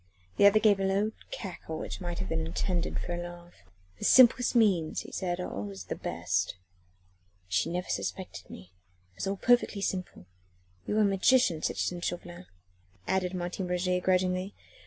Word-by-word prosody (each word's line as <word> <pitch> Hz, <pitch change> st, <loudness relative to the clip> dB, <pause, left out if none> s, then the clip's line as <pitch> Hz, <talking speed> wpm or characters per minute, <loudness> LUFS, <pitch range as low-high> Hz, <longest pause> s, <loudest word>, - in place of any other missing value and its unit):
The 200 Hz, -, +8 dB
other 205 Hz, +1 st, +5 dB
gave 210 Hz, -2 st, +4 dB
a -, -, 0 dB
low 195 Hz, +3 st, +1 dB, 0.2 s
cackle, 175 Hz, -5 st, -6 dB
which -, -, -6 dB
might 175 Hz, -1 st, -4 dB
have 95 Hz, -, -3 dB
been 80 Hz, -, -1 dB
intended 170 Hz, -, -1 dB
for 175 Hz, -, -4 dB
a 175 Hz, -, -3 dB
laugh. 175 Hz, 0 st, -9 dB, 0.5 s
"The -, -, -3 dB
simplest 250 Hz, -1 st, +6 dB
means," 190 Hz, -9 st, +3 dB
he -, -, -11 dB
said, 180 Hz, -2 st, -2 dB
"are 180 Hz, -, -4 dB
always 100 Hz, -1 st, -6 dB
the 90 Hz, -, -5 dB
best." -, -, -2 dB, 0.9 s
"She 90 Hz, -, 0 dB
never 180 Hz, +2 st, -3 dB
suspected 95 Hz, -, -4 dB
me. 90 Hz, 0 st, -12 dB, 0.4 s
It 90 Hz, -, -33 dB
was -, -, -3 dB
all 195 Hz, +1 st, -1 dB
perfectly 240 Hz, -3 st, +2 dB
simple. 185 Hz, -, -3 dB, 0.6 s
You 210 Hz, -, 0 dB
are -, -, +5 dB
a -, -, +5 dB
magician, 195 Hz, -3 st, +3 dB
citizen 175 Hz, -1 st, -2 dB
Chauvelin," 175 Hz, +1 st, -5 dB, 0.6 s
added 185 Hz, -1 st, 0 dB
Martin 180 Hz, +1 st, -3 dB
Roget 180 Hz, 0 st, 0 dB
grudgingly. 185 Hz, +1 st, +1 dB
180 Hz, 170 wpm, -29 LUFS, 175-195 Hz, 0.9 s, The